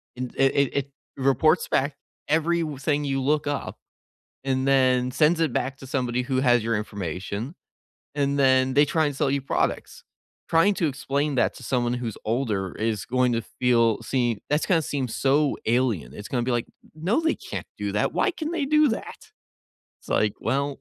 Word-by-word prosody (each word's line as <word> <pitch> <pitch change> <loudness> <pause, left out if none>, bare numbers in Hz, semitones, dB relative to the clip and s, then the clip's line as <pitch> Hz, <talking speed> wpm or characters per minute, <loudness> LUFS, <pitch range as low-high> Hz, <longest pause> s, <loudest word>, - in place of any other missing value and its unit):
It 125 0 -5
it 135 0 +3
it 140 -2 +2
it 140 0 -2 0.3
reports 140 +5 +3
back 140 +1 0 0.3
everything 155 -2 0
you 135 -1 -1
look 150 +2 +1
up, 145 -1 -3 0.7
and 130 0 0
then 130 -2 +3
sends 155 +5 +3
it 160 -6 +1
back 135 +3 -2
to 135 - -10
somebody 125 -2 -1
who 130 0 0
has 120 -3 +4
your 115 0 0
information, 100 - -5 0.6
and 140 -1 0
then 130 -1 +3
they 145 - +6
try 155 +2 +1
and 145 - -2
sell 135 - +1
you 140 0 0
products. 135 - -2 0.4
Trying 180 +5 +4
to 170 -6 0
explain 140 +1 -2
that 120 - +2
to - - -12
someone 120 0 0
who's 120 -3 -4
older, 105 -6 -1
is 110 -2 -1
going 125 0 +2
to 115 0 0
feel 115 -3 +1
see, 120 -5 -1
that's 150 +1 +1
gonna 165 -4 +3
seem 135 -1 -2
so 140 +5 +1
alien. 115 - 0
It's 105 - -8
gonna 125 -2 -1
be 130 - -1
like, 120 -1 0 0.3
"No, 185 - 0
they 325 0 +1
can't - - -7
do - - -3
that. - - 0
Why - - +2
can 315 -2 -4
they 330 -4 -1
do 305 +1 +4
that?" 225 - -6 0.7
It's - - -19
like, 105 -1 +1
"Well" 140 +1 -1
135 Hz, 185 wpm, -25 LUFS, 120-150 Hz, 0.7 s, they